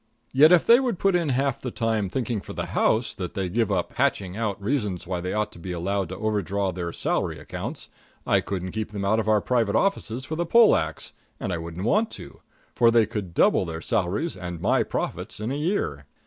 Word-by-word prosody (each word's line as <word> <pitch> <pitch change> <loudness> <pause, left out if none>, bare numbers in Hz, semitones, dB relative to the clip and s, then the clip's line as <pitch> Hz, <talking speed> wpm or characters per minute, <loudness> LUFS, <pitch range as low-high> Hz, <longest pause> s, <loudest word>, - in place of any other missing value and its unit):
Yet 150 +5 +6
if 180 -2 +6
they 235 +1 +7
would 245 -7 -1
put 195 +1 +2
in 170 -4 +1
half 135 +1 0
the 125 - -3
time 110 -4 -1
thinking 120 -2 -2
for - - -9
the - - -3
house 110 +1 +2
that 90 +1 -6
they 95 -3 -1
give 110 +2 0
up 90 -3 0
to - - -22
hatching 95 -2 0
out 105 -3 -2
reasons 105 -5 -2
why 90 -1 -3
they 90 +1 -3
ought 105 0 -1
to - - -13
be 90 +2 -6
allowed 95 +1 -1
to 95 - -6
overdraw 100 -2 -1
their 85 -1 -4
salary - - -1
accounts, - - -6 0.4
I - - +3
couldn't 95 -2 -4
keep 110 -1 -4
them 100 -1 -3
out 110 +3 +2
of 110 - -2
our 105 -1 +4
private 115 -4 +1
offices 130 - 0
with 160 +1 -4
a 175 - +1
pole 230 +4 +6
ax, 80 -1 -3 0.3
and 95 - -3
I 85 - -2
wouldn't 85 +3 -6
want 215 - +2
to; - - -10 0.3
for 120 -1 +5
they 115 -1 +4
could 105 -6 -5
double - - +4
their 80 -2 -5
salaries 100 - -1
and 90 -2 -6
my - - +2
profits - - -4
in 110 +4 -3
a - - -1
year. 145 - -2
105 Hz, 230 wpm, -25 LUFS, 90-125 Hz, 0.4 s, they